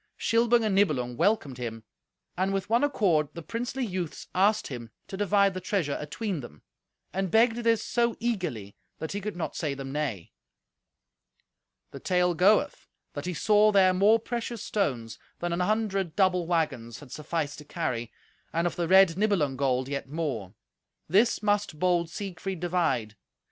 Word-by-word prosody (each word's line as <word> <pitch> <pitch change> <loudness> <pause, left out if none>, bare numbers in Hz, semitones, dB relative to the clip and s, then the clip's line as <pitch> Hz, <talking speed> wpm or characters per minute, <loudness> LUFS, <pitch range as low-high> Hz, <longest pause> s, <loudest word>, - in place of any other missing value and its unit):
Shilbung 235 +1 +3
and 210 - +1
Nibelung 140 -12 +1
welcomed 165 - +1
him, 115 -2 -5 0.5
and 190 +2 0
with 195 +2 -3
one 235 +4 +4
accord 185 - +2
the 170 - -7
princely 245 - -3
youths 180 -6 -4
asked 205 +4 +3
him 120 -4 -7 0.2
to - - -6
divide 200 0 +3
the 185 - -5
treasure 180 -6 -1
atween 175 +5 -3
them, 75 - -11 0.5
and 190 0 -1
begged 225 +3 +4
this 230 -2 +2
so 235 -1 +1
eagerly 175 - -3 0.2
that 160 - -5
he 205 - -3
could 210 0 -4
not 175 - -4
say 150 -4 -2
them 135 -1 -6
nay. 135 - -3 1.6
The - - -8
tale 180 -1 +2
goeth 190 +5 +2 0.3
that - - -5
he 180 - -3
saw 210 +5 +4
there 190 -2 +5
more 205 +4 +5
precious 235 0 -4
stones 125 - -2 0.2
than 175 0 -2
an 170 - -1
hundred 195 -3 0
double 180 -3 +2
waggons 140 -9 -1
had 145 -4 -13
sufficed 150 0 -3
to - - -10
carry, 125 -8 -3 0.4
and 165 +1 0
of 175 - -1
the 170 -1 0
red 190 -2 +6
Nibelung 190 -11 +1
gold 130 -1 0
yet 140 -1 -4
more. 140 - -3 0.5
This 210 +6 +3
must 205 -5 0
bold 175 0 +1
Siegfried 190 0 -5
divide. 165 -11 0
180 Hz, 165 wpm, -27 LUFS, 145-205 Hz, 1.6 s, red